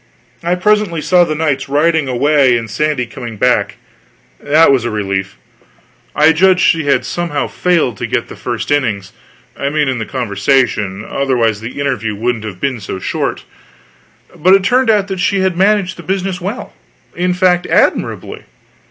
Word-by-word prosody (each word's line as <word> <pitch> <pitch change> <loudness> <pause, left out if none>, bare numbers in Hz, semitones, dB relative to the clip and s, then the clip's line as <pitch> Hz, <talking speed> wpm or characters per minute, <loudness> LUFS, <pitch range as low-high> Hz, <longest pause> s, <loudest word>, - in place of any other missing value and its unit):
I 175 +1 +1
presently 210 -2 +1
saw 180 +3 +3
the 155 -2 -3
knights 140 -4 -1
riding 155 +1 +2
away, 130 0 +3
and 115 -1 -5
Sandy 150 0 -1
coming 115 -1 -8
back. - - +1 0.6
That 150 +1 +4
was 130 -4 +2
a 120 - -2
relief. 95 -2 -3 0.8
I 150 +2 +5
judged 185 +3 +3
she 160 -3 +2
had 140 - +1
somehow 170 -4 -2
failed 165 - 0
to - - -4
get - - -2
the - - -10
first 120 0 -4
innings 105 -9 -1 0.4
I 140 - -2
mean 150 0 0
in 130 -2 -1
the 110 - -4
conversation; 110 -3 0
otherwise 120 -6 0
the 120 +5 -7
interview 120 -7 -2
wouldn't 115 +1 -2
have 95 -4 -7
been 130 0 -2
so 100 -2 -6
short. - - -3 0.9
But 185 +5 +4
it 195 - +1
turned 250 +4 +2
out 205 -3 +3
that 190 -2 -4
she 195 +2 +1
had 190 -2 0
managed 195 0 +1
the - - -8
business 190 -1 -3
well; - - -5 0.4
in 180 +1 0
fact, 180 -1 +2
admirably. - - 0
145 Hz, 170 wpm, -15 LUFS, 115-180 Hz, 0.9 s, I